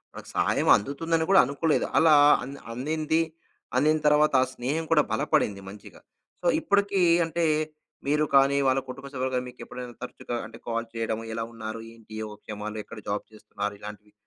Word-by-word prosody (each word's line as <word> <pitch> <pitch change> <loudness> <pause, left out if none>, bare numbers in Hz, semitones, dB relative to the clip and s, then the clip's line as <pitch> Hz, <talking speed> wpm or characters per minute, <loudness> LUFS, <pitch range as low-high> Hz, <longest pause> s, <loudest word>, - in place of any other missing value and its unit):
మనకి - - -10
సహాయం - - +1
అందుతుందని 160 +7 -1
కూడా 195 - +7
అనుకోలేదు. 145 +4 0
అలా 160 -1 +6 0.3
అంద్ 140 +2 -8
అందిందీ, 155 +6 -1 0.6
అందిన 155 +4 +4
తర్వాత 150 0 +4
ఆ - - +3
స్నేహం 140 +7 -2
కూడా 155 -2 +6
బలపడింది 105 -2 +1
మంచిగా. 100 +1 -13 0.4
సో, 175 - -1
ఇప్పుడికీ 200 -1 +1 0.2
అంటే, 165 +1 -1 0.6
మీరు 150 +1 +2
కానీ, 135 +1 +5
వాళ్ళ 130 +1 +3
కుటుంబ 135 +2 -8
సభ్యులు 130 0 -2
గానీ, 125 0 -1
మీకెప్పుడైనా 125 0 -9
తరుచుగా 120 -1 -5
అంటే, 115 +1 -13
కాల్ 115 0 -2
చెయడము, 115 -1 -3
ఎలా 115 0 -2
ఉన్నారు, 110 0 -6
ఏంటి, 110 -1 -16
యోగ 105 -1 -7
క్షేమాలు, 105 0 -6
ఎక్కడ 110 +1 -10
జాబ్ 100 0 -2
చేస్తున్నారు, 105 -1 -5
ఇలాంటివి 105 0 -10
125 Hz, 160 wpm, -26 LUFS, 110-150 Hz, 0.6 s, కూడా